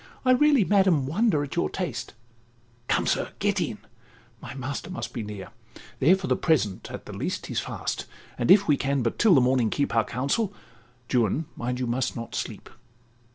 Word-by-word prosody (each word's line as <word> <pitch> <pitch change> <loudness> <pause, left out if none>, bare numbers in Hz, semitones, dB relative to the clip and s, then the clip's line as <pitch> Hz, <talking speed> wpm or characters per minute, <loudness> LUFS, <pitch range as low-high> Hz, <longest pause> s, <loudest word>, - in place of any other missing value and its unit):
I 255 - +5
really, 280 -2 +5
madam, 190 -8 +3
wonder 160 - +2
at 140 - -6
your 170 - +1
taste 170 -11 -4 0.7
(Come, - - +1
sir, - - 0
get - - +1
in)—my 120 - -9
master 135 +5 -5
must 185 - -5
be 120 - -3
near: 105 -2 -7 0.5
There, 165 +8 +6
for 190 -1 -5
the - - +2
present, 120 - 0
at - - -8
the - - -8
least, - - -3
he's - - -2
fast, - - -4 0.3
And 120 - -2
if 200 +1 +7
we 145 -3 +4
can 140 -1 0
but 115 - -2
till 220 -6 +6
the 135 - +6
morning 125 -2 +2
keep 140 -1 -1
Our 115 - +4
counsel—(Juan, 125 - -2
mind, 125 +1 -3
you 125 - -1
must 125 +2 -1
not 115 -1 -6
sleep). - - -5
135 Hz, 180 wpm, -26 LUFS, 120-185 Hz, 0.7 s, if